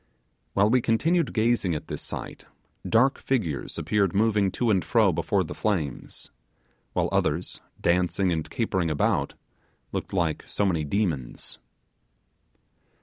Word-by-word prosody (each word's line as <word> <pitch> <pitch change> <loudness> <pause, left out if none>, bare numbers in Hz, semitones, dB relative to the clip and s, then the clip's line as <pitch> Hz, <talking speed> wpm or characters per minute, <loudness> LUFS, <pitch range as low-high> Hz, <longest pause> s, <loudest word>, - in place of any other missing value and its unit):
While 100 +2 +3
we 125 0 +4
continued 160 +10 +2
gazing 110 -6 +1
at 75 - -5
this - - -5
sight, - - -7 0.4
dark 125 +4 +4
figures 95 - -2
appeared 100 -4 +1
moving 105 -2 +3
to 120 -2 +1
and 95 -4 +2
fro 80 - +3
before - - +1
the - - -6
flames; 80 - -3 0.6
while - - +1
others, 85 +5 -1 0.2
dancing 90 +2 +2
and 80 -2 -2
capering 95 -7 0
about, 75 - 0 0.6
looked - - -4
like 85 -5 0
so 100 - 0
many 85 -5 +1
demons. 75 - -2
95 Hz, 130 wpm, -26 LUFS, 85-110 Hz, 0.6 s, we